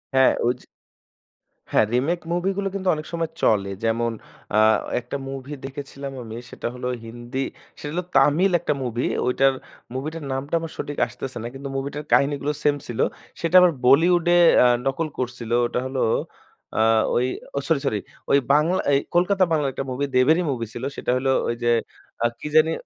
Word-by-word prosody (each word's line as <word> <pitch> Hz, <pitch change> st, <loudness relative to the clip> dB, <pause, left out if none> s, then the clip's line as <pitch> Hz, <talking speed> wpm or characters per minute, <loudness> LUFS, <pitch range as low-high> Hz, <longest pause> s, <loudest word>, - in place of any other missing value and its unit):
হ্যাঁ, 130 Hz, 0 st, +6 dB
ওইযে 125 Hz, +1 st, 0 dB, 1.1 s
হ্যাঁ, -, -, +4 dB
রিমেক 145 Hz, +8 st, +1 dB
মুভিগুলো 195 Hz, +3 st, -1 dB
কিন্তু 190 Hz, -1 st, -3 dB
অনেক 155 Hz, 0 st, -6 dB
সময় 165 Hz, -1 st, -1 dB
চলে। 100 Hz, -3 st, +2 dB
যেমন 115 Hz, +1 st, +1 dB, 0.4 s
আ -, -, +4 dB, 0.4 s
একটা 125 Hz, +3 st, -5 dB
মুভি 135 Hz, +1 st, -6 dB
দেখেছিলাম 140 Hz, 0 st, -7 dB
আমি। 110 Hz, 0 st, -7 dB
সেটা -, -, -5 dB
হলো 125 Hz, 0 st, -4 dB, 0.2 s
হিন্দি, 120 Hz, +3 st, -6 dB, 0.4 s
সেটা 145 Hz, -, -5 dB
হলো 180 Hz, +2 st, -1 dB
তামিল 150 Hz, +8 st, +4 dB
একটা 160 Hz, -2 st, 0 dB
মুভি। 120 Hz, 0 st, -2 dB, 0.2 s
ওইটার 135 Hz, +2 st, +3 dB, 0.4 s
মুভিটার 155 Hz, +5 st, -4 dB
নামটা 135 Hz, +3 st, -4 dB
আমার 165 Hz, -1 st, -6 dB
সঠিক 145 Hz, -, -5 dB
আসতেছে 130 Hz, -2 st, -7 dB
না। -, -, -3 dB
কিন্তু 135 Hz, +1 st, -7 dB
মুভিটার 140 Hz, +2 st, -4 dB
কাহিনীগুলো 140 Hz, +1 st, +2 dB
সেইম 145 Hz, -1 st, +3 dB
ছিল। 120 Hz, -, -6 dB, 0.4 s
সেটা 170 Hz, +2 st, 0 dB
আবার 180 Hz, -1 st, +6 dB
বলিউডে 170 Hz, +6 st, +5 dB, 0.3 s
আ -, -, +5 dB, 0.2 s
নকল 135 Hz, +4 st, 0 dB
করছিলো। 120 Hz, -2 st, -2 dB
ওটা 125 Hz, -, -2 dB
হলো 130 Hz, 0 st, -2 dB, 0.8 s
আ -, -, +2 dB, 0.4 s
ওই 125 Hz, -, +2 dB, 0.3 s
ও -, -, +3 dB
সরি! 160 Hz, -4 st, +2 dB
সরি! 110 Hz, -6 st, 0 dB, 0.3 s
ওই -, -, +6 dB, 0.2 s
বাংলা 160 Hz, +5 st, +3 dB
এই 140 Hz, -, +5 dB, 0.2 s
কলকাতা 185 Hz, +2 st, +3 dB
বাংলার 150 Hz, -4 st, +2 dB
একটা 135 Hz, -, -4 dB
মুভি, 135 Hz, +3 st, -1 dB
দেবেরই 155 Hz, +8 st, +4 dB
মুভি 120 Hz, -3 st, -3 dB
ছিল। 120 Hz, -, -7 dB
সেইটা -, -, -2 dB
হলো 135 Hz, +1 st, +1 dB, 0.2 s
ওইযে 120 Hz, 0 st, -1 dB, 0.5 s
আ -, -, +4 dB
কি -, -, -5 dB
জানি? 160 Hz, +1 st, +6 dB
140 Hz, 170 wpm, -23 LUFS, 125-160 Hz, 1.1 s, হ্যাঁ